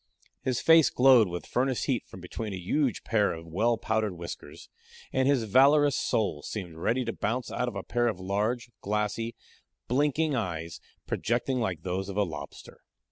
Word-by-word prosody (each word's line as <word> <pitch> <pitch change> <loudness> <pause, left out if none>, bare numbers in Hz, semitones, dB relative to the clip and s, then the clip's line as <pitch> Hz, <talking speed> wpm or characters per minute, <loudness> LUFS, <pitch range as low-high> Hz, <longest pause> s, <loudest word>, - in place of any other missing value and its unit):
His 130 -2 -1
face 165 -2 +6
glowed 125 -4 +6
with 90 0 -5
furnace 130 0 0
heat 130 -5 -1
from 95 - -11
between 105 +4 -5
a - - -3
huge 125 - 0
pair 105 -3 +2
of 80 0 -8
well 110 +8 +1
powdered 110 -3 -1
whiskers, 85 0 -8 0.5
and 130 0 +2
his 140 -4 +3
valorous 140 +6 +5
soul 100 -9 0
seemed 90 -1 -6
ready 120 +9 0
to 115 - -2
bounce 120 +4 -2
out 125 - -1
of 120 - -4
a 100 - -4
pair 120 0 0
of 105 -6 -2
large, 105 +6 -1
glassy, 105 +3 -2 0.5
blinking 145 +4 +1
eyes, 85 -7 -3 0.3
projecting 125 +2 -1
like 90 -8 -2
those 95 +1 -3
of 100 - -5
a 105 - +4
lobster. 80 -6 -8
110 Hz, 175 wpm, -28 LUFS, 95-125 Hz, 0.5 s, face